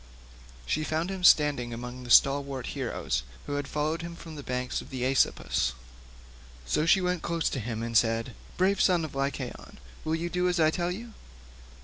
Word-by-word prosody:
She 155 - 0
found 160 +4 -1
him 190 -1 -5
standing 145 -8 +5
among 125 +1 -7
the 120 - -9
stalwart 135 0 +4
heroes 65 - -2 0.2
who 145 - -4
had 145 -1 -2
followed 155 +2 -1
him 170 0 -7
from 165 -2 -10
the 145 - -6
banks 125 -1 -2
of - - -13
the 130 -1 -3
Aesopus, 125 - +1 0.9
so 150 - +1
she 190 +3 +5
went 180 -2 0
close 165 -2 0
up - - -7
to 135 - -1
him 115 0 -4
and 115 0 -4
said, 115 +1 +2 0.2
"Brave 190 +2 +2
son 175 -4 +3
of 155 - -8
Lycaon, 135 -2 -4 0.3
will 160 - 0
you 165 +1 -2
do 180 0 +1
as 180 -1 0
I 155 -1 +5
tell 175 +1 -1
you? 225 +5 -6
150 Hz, 195 wpm, -28 LUFS, 125-170 Hz, 0.9 s, standing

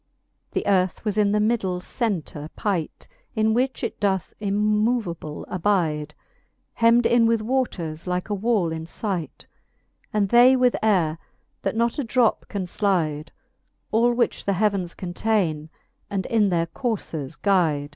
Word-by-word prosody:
The - - -1
earth 185 0 +1
was 210 -2 0
in 210 -1 +3
the 210 - +2
middle 210 -5 0
centre 180 - -3
pight, 185 -7 -3 0.3
In 220 0 +2
which 255 +3 0
it 230 - -3
doth 190 -4 0
immoveable 210 -5 0
abide, 165 -6 0 0.6
Hemd 230 +1 +5
in 235 -1 +4
with 230 -1 +1
waters 190 -11 -2
like 180 0 -1
a 210 - -2
wall 205 -4 +1
in 160 0 -5
fight; 180 - -4 0.7
And 205 -2 +1
they 245 +3 +7
with 250 -1 +3
aire, 175 -7 +2 0.4
that - - -2
not 235 +4 0
a - - 0
drop 240 -1 +1
can 200 -3 -3
flide: 170 -6 -1 0.6
Al 235 +2 +4
which 240 0 0
the 200 - +1
heavens 195 -3 0
containe, 175 -4 -1 0.4
and 195 -3 -2
in 215 -3 +2
their 170 -2 +1
courfes 165 - -4
guide. 160 -8 +2
200 Hz, 145 wpm, -24 LUFS, 170-225 Hz, 0.7 s, they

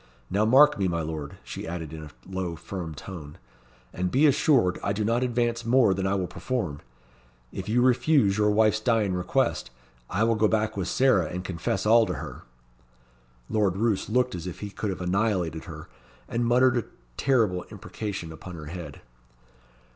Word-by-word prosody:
"Now, 100 +3 +2
mark 135 +3 +6
me, 95 - +2
my 85 -2 -1
Lord," 75 -2 -6
she - - -7
added 80 -2 -5
in 80 - -7
a 75 - -9 0.2
low, 95 -2 -3
firm 85 -2 -6
tone, 75 -3 -9 0.6
"and 90 0 -1
be 135 +10 +3
assured 135 -9 +3
I 100 - 0
do 105 +1 -1
not 115 +3 +1
advance 120 -2 0
more 120 -3 +4
than 95 0 -1
I 95 - +1
will 95 -2 -1
perform. 90 - -3 0.7
If - - -6
you 120 +3 +3
refuse 130 -4 +3
your 105 0 +2
wife's 110 0 +3
dying 110 -4 +1
request, 90 +9 0 0.4
I 100 +4 0
will 115 0 +3
go 110 -1 +3
back 110 0 0
with 95 -3 -2
Sarah 115 -11 +3
and 90 +3 -5
confess 95 +2 -2
all 115 +1 +5
to - - -2
her." - - -7 1.1
Lord 100 -4 +1
Roos 110 -2 0
looked 125 +2 +1
as 90 0 -5
if 90 - -7
he 105 -1 -5
could 105 - -3
have 95 -2 -4
annihilated 90 -4 0
her, - - -9 0.4
and 120 0 -1
muttered 125 +1 +4
a 120 - -1 0.3
terrible 110 - +1
imprecation 95 -7 -6
on 90 -2 -8
her 80 -2 -8
head. 80 -2 -8
100 Hz, 180 wpm, -26 LUFS, 90-115 Hz, 1.1 s, mark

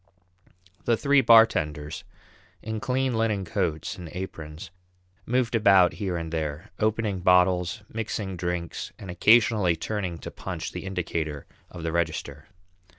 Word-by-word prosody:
The 115 -1 +3
three 140 +1 +4
bartenders, 85 - +4 0.6
in 110 0 -3
clean 130 +2 0
linen 110 -4 0
coats 85 -3 -2
and 85 -2 -8
aprons, 80 -1 -7 0.6
moved 125 -1 +1
about 100 -5 +5
here 95 -4 -3
and 80 -1 -5
there, 80 +3 -4
opening 110 -2 0
bottles, 90 +1 +3
mixing 105 -3 -4
drinks, 90 -1 -4
and 95 - -8
occasionally 105 -3 +4
turning 90 0 -3
to - - -8
punch - - -6
the - - -7
indicator 80 -5 -3 0.2
of 85 -2 -9
the 80 - -1
register. 80 -4 -3
90 Hz, 130 wpm, -26 LUFS, 85-110 Hz, 0.6 s, about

